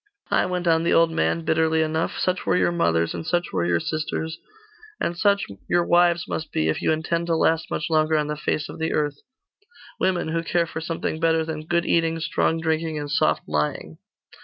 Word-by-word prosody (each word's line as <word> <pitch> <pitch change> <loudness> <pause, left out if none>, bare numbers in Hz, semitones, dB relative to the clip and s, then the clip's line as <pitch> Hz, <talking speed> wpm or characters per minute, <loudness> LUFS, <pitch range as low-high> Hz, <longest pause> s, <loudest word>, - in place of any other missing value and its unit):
'Ay,' - - +3
went 180 -1 -2
on 160 -1 +4
the 170 - 0
old 165 0 +4
man, 165 0 0
bitterly 160 0 +2
enough, 160 +1 -2
'such 185 0 0
were - - +2
your 175 - +2
mothers; 85 - +1
and - - -5
such 175 0 0
were 85 -2 0
your 85 -1 +2
sisters; 160 - -3 0.6
and 170 - -1
such 200 +2 +2 0.2
your 175 -1 +2
wives 175 -1 +3
must 160 - -4
be, 80 - 0
if 80 - -1
you - - +2
intend 165 +2 -1
to 165 - +2
last 160 0 +1
much 150 - -2
longer 155 -1 +2
on 150 - +1
the 150 +1 -3
face 150 0 -2
of - - -10
the 160 - -1
earth 145 -2 -1 0.8
women 180 -3 0
who 165 +1 0
care 170 +1 +1
for 160 -1 -6
something 160 -1 -3
better 165 -1 +2
than 155 -1 -6
good 170 0 +1
eating, 165 -1 +1
strong 165 0 0
drinking, 160 -1 -1
and 145 -1 -5
soft - - +2
lying. 75 +1 -2
160 Hz, 210 wpm, -24 LUFS, 155-170 Hz, 0.8 s, on